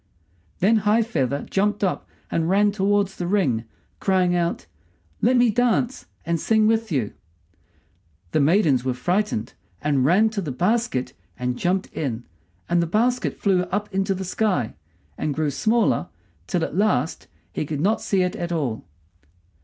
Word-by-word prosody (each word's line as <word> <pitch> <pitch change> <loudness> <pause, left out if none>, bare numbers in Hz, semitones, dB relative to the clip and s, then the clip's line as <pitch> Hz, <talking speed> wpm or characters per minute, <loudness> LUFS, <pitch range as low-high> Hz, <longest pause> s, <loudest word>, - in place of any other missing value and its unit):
Then 215 +5 +4
High 215 +2 +3
feather 140 - -1
jumped 205 +1 0
up 190 - -1 0.2
and 165 0 0
ran 205 +2 +4
towards 200 -1 +1
the 175 - -3
ring, 140 - +1 0.3
crying 185 -2 +2
out, 170 -1 -1 0.6
"Let 250 +1 +4
me 245 -2 +4
dance 245 +2 0 0.2
and 170 0 0
sing 220 +3 +3
with 225 -1 +1
you!" 125 -9 -1 1.2
The - - +2
maidens 150 - +3
were 130 -1 -1
frightened, 180 - -1 0.3
and 145 -3 +1
ran 195 +10 +4
to 210 -2 -2
the 155 -6 -4
basket 180 - 0 0.2
and 125 0 -2
jumped 185 +7 -1
in, 120 -6 -3 0.4
and 175 0 +2
the 170 - 0
basket 240 +8 +1
flew 190 -3 +2
up 205 +3 -3
into 195 0 0
the 190 +1 -5
sky, 185 - 0 0.5
and 150 -2 -1
grew 155 -2 0
smaller 220 - +1 0.4
till 175 - 0
at - - -3
last 180 -8 0 0.3
he - - -2
could 150 -1 -4
not 205 +8 +1
see 190 -2 +1
it 180 - -2
at 175 0 -4
all. 140 -10 -2
185 Hz, 160 wpm, -23 LUFS, 150-210 Hz, 1.2 s, Then